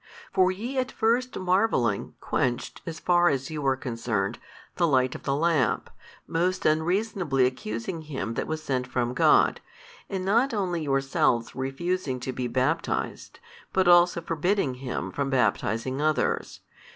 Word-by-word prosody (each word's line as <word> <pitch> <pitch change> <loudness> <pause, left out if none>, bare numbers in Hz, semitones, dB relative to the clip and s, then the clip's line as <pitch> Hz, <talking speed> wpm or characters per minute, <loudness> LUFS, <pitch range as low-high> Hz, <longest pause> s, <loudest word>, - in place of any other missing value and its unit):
For 185 0 +4
ye 240 +8 -3
at 255 0 -2
first 245 +3 +1
marvelling 180 - +1
quenched 120 -2 -2
(as 165 0 -5
far 175 -1 +4
as 135 +1 -2
you 150 -2 -4
are 135 - +3
concerned) 115 -6 -2 0.4
the 170 - +3
light 130 -3 +2
of - - -8
the 135 - -1
lamp, 155 -6 +1 0.3
most 180 +3 -1
unreasonably 165 - +1
accusing 125 - -3
him 140 -7 -4
that - - -3
was 155 0 -4
sent 130 -3 -1
from 125 -1 -1
God, - - +4 0.5
and 190 -1 -3
not 230 +5 +2
only 180 -5 -1
yourselves 135 -4 +1
refusing 135 +2 -2
to 130 - -3
be 125 0 -2
baptized, 130 +2 -2 0.3
but 190 -1 +2
also 175 0 +5
forbidding 165 -2 0
him 130 -2 -4
from 140 -1 -2
baptizing 130 0 0
others. 155 0 0
155 Hz, 145 wpm, -26 LUFS, 130-180 Hz, 0.5 s, also